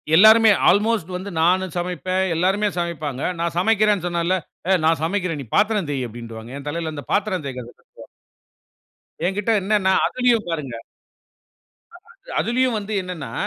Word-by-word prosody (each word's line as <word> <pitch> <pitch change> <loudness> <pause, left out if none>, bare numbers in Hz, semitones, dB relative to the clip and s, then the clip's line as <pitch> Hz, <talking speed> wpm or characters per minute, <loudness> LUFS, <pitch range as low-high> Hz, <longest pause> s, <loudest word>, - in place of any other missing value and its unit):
எல்லாருமே, 220 +4 +7 0.2
அல்மோஸ்ட் 205 -2 +1
வந்து 190 +3 -5
நானும் 185 +1 +2
சமைப்பேன். 180 +1 -1
எல்லோருமே 190 +5 +1
சமைப்பாங்க. 155 -6 -3 0.2
நான் 170 -1 -2
சமைக்கிறேன்னு 210 -1 +2
சொன்னாலே, 175 +1 0 0.3
"ஏய்! 190 -1 +4
நான் 160 -1 +2
சமைக்கிறேன். 175 -2 -1
நீ - - -8
பாத்திரம் 210 -4 +2
தேயி" 135 -3 -2
அப்பிடீன்ருவாங்க. 115 0 -9
என் 140 +1 -9
தலைல 160 0 -4
அந்த 145 -2 -7
பாத்திரம் 195 -5 0
தேய்க்கிறது 125 -3 -7
விழுந்துரும். - - -16 1.2
எங்கிட்ட 200 +4 -1
என்னன்ன, 200 -1 +1 0.2
அதிலயும் 245 -3 +1
பாருங்க 150 -7 -4 1.2
ஆமா. 365 - -22 0.3
அதிலயும் 250 0 +1
வந்து 210 +1 -6
என்னன்னா, 165 -10 -7
180 Hz, 140 wpm, -21 LUFS, 155-210 Hz, 1.2 s, எல்லாருமே